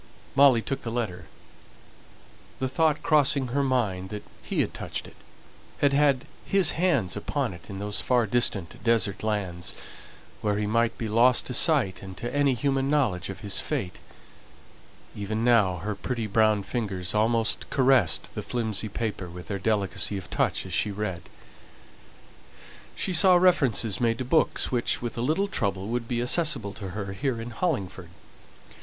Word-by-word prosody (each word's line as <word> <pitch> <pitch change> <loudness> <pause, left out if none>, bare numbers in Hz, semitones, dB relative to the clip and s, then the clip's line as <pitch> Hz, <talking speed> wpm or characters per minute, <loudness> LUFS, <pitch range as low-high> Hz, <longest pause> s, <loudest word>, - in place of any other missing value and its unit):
Molly 135 -4 +6
took 135 - -3
the 115 - -5
letter, 105 -8 -3 1.3
the 130 - -1
thought 155 +3 +1
crossing 140 -4 +3
her 140 +4 0
mind 110 -9 0
that 105 0 -6 0.2
he - - -1
had - - -2
touched - - -5
it, - - -14 0.6
had 140 -1 +2
had 140 -2 +3 0.2
his 195 -5 +4
hands 160 - +1
upon - - -2
it, 85 -1 -13
in 100 - -6
those 105 +1 -2
far 125 -2 +2
distant 100 -5 -1
desert 115 -4 +1
lands, 95 -5 -2 0.7
where 105 -1 0
he 105 - -1
might 115 +2 +1
be 115 - -3
lost 120 +4 +4
to 125 - -4
sight 125 - +3
and 95 -1 -9
to 120 +5 -5
any 140 -2 +3
human 135 +1 0
knowledge 110 - +1
of 95 - -7
his 100 -2 0
fate; 90 -2 -3 1.2
even 110 +2 -3
now 105 -7 +3
her 105 +5 -3
pretty 115 +4 -4
brown 110 -1 +2
fingers 95 -6 -3
almost 115 +1 +1
caressed 130 - +2
the - - -4
flimsy 110 -3 -2
paper 105 -4 -4
with 90 +1 -10
their 100 -1 -2
delicacy 100 0 -1
of 90 -4 -9
touch - - 0
as - - -7
she 105 - +1
read. 100 -4 -5 1.7
She 185 - -2
saw 185 +2 +6
references 135 - +3
made 115 -1 +2
to 130 - -4
books, 160 +6 +2
which, 120 -2 0
with 120 - -4
a 115 - -3
little 160 +10 +1
trouble, 100 - -2
would 120 0 -2
be 120 0 -1
accessible 130 - +1
to 100 -3 -7
her 100 -2 -4
here 130 +2 -2
in 115 +1 -6
Hollingford. 100 - -3
115 Hz, 165 wpm, -26 LUFS, 100-130 Hz, 1.7 s, Molly